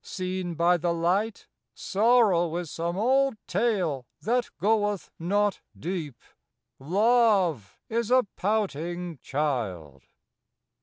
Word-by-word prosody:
Seen 185 -2 -4
by 170 +2 +3
thy 175 +1 -1
light 180 +6 0 0.3
Sorrow 200 -6 +3
is 175 -3 -5
some 170 +2 -3
old 265 +3 +2
tale 180 - 0
that 245 +2 0
goeth 205 +1 0
not 205 +4 0 0.2
deep; 160 -7 -4 0.6
Love 190 - +2
is 230 0 -1
a 255 -1 +4
pouting 175 -5 -2
child. 105 - -3
180 Hz, 100 wpm, -27 LUFS, 165-215 Hz, 0.6 s, a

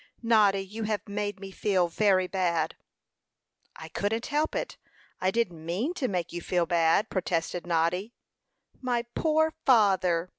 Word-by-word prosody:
"Noddy 205 -4 +4
you 215 +3 -5
have 210 -1 -2
made 205 0 -3
me 195 0 -8
feel 190 -3 +1
very 190 +1 +2
bad." 170 -4 0 1.0
"I 160 - -9
couldn't 205 +7 -2
help 300 +1 0
it; - - -3 0.4
I 185 - +1
didn't 185 -7 -1
mean 195 - -2
to 295 -8 -1
make 180 -5 -3
you 175 - -4
feel 175 0 0
bad," 170 +4 +3
protested 175 -1 -2
Noddy. 175 +7 0 0.7
"My 245 -2 -1
poor 315 0 +2
father!" 185 -7 +3
195 Hz, 145 wpm, -28 LUFS, 175-225 Hz, 1.0 s, Noddy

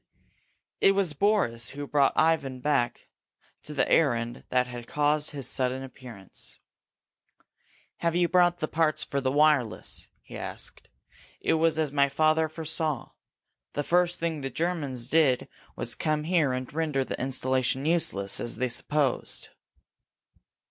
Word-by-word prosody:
It 195 - +5
was 195 -5 +1
Boris 145 - +1
who 145 +1 -6
brought 140 -1 +3
Ivan 155 -5 +2
back 125 -3 0 0.5
to - - -7
the - - +1
errand 115 0 +1
that 125 0 +2
had 120 -1 -8
caused 150 0 +1
his 140 -4 -4
sudden 130 +1 -1
appearance. 120 -7 -8 1.4
"Have 170 0 0
you 175 0 +3
brought 175 0 +4
the 155 - 0
parts 155 -1 +1
for 140 -1 -2
the 130 0 0
wireless?" 145 -5 +1
he - - -11
asked. - - -8 0.5
"It - - +1
was 160 0 +2
as 155 -3 +1
my 140 -1 +3
father 155 +2 +2
foresaw. 155 -3 -2 0.6
The 145 - -1
first 175 +2 +2
thing 165 -3 -2
the 135 - -3
Germans 145 -7 -2
did 140 -4 +3 0.3
was - - -3
to - - -1
come 155 -1 0
here 160 -4 +2
and 130 +1 -4
render 150 -4 0
the - - -5
installation 130 0 0
useless, 100 - +1
as 120 - -2
they 125 +2 -1
supposed." 140 +2 0
145 Hz, 145 wpm, -27 LUFS, 130-160 Hz, 1.4 s, It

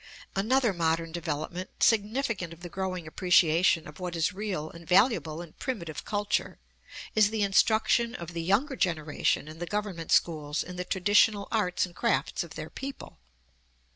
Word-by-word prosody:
Another 230 +3 +2
modern 165 -1 0
development, 170 +2 -4
significant 215 -5 +1
of 165 - -16
the 175 - -7
growing 185 -3 -3
appreciation 170 0 +3
of 150 +3 -12
what 180 -1 -4
is 165 +4 +1
real 190 -6 -3
and 170 -1 -13
valuable 180 -5 +3
in 165 - -14
primitive 170 - -5
culture, 205 0 -1 0.6
is 215 -1 +5
the 220 -1 -1
instruction 225 +4 +3
of 170 0 -7
the 170 - -3
younger 215 - +1
generation 155 - 0
in 155 +1 -10
the 175 - -4
Government 200 -5 -3
schools 150 -3 +2
in 180 - -9
the 180 0 -4
traditional 205 +2 +3
arts 195 -6 +1
and 175 -1 -14
crafts 230 -3 0
of 170 - -11
their 155 +1 -7
people. 275 0 -8
180 Hz, 160 wpm, -28 LUFS, 165-210 Hz, 0.6 s, is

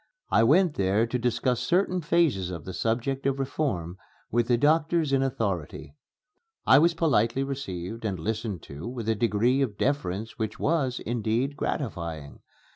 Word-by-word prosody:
I - - +5
went 165 +6 +4
there 100 +3 +2
to 125 +2 -2
discuss 125 +1 0
certain 180 +7 +1
phases 150 - +1
of 85 -4 -7
the 95 - -6
subject 125 +6 -1
of 135 0 0
reform 120 - -2 0.3
with 120 +1 +1
the 120 - +3
doctors 155 +2 +2
in 135 - +3
authority. 110 - -3 0.7
I 135 - +7
was 165 +2 +3
politely 135 -6 +2
received 115 -6 -5
and 100 -4 -2
listened 105 0 -3
to 70 +8 -8
with 120 -3 -5
a 115 - +3
degree 115 +4 +2
of 110 -7 -1
deference 115 -5 -2
which 110 -1 -3
was, 140 -6 0
indeed, 120 +4 -1
gratifying. 85 - -4
120 Hz, 155 wpm, -27 LUFS, 105-140 Hz, 0.7 s, I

